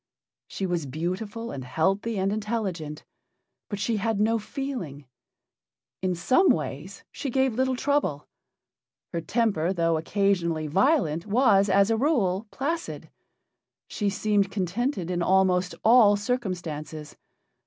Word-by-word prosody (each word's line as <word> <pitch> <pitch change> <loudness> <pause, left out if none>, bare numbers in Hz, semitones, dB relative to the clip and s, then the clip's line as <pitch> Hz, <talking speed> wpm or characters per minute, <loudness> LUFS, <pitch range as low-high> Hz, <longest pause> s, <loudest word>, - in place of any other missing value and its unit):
She 195 - -4
was 175 -5 -2
beautiful 195 - -4
and 130 - -6
healthy 195 - 0
and 195 +1 0
intelligent, 200 -8 -3 0.6
but 205 - -3
she 215 +2 -1
had 220 0 -1
no 225 +2 +2
feeling. 210 - -5 1.0
In 185 -1 0
some 255 - +3
ways 160 +5 -2
she 280 - -4
gave 265 0 +1
little 260 +2 +1
trouble. 280 - 0 0.9
Her 170 - -1
temper, 195 -4 0
though 165 -2 +1
occasionally 170 -2 0
violent, 175 - +1
was, 205 -3 +4
as 200 +3 +4
a 225 - +2
rule, 220 - +1
placid; 325 +8 -4 0.8
she 205 -2 -1
seemed 205 0 +1
contented 195 - -2
in 175 -1 -1
almost 185 0 +2
all 225 -3 +6
circumstances. 175 -9 -4
195 Hz, 120 wpm, -26 LUFS, 170-230 Hz, 1.0 s, all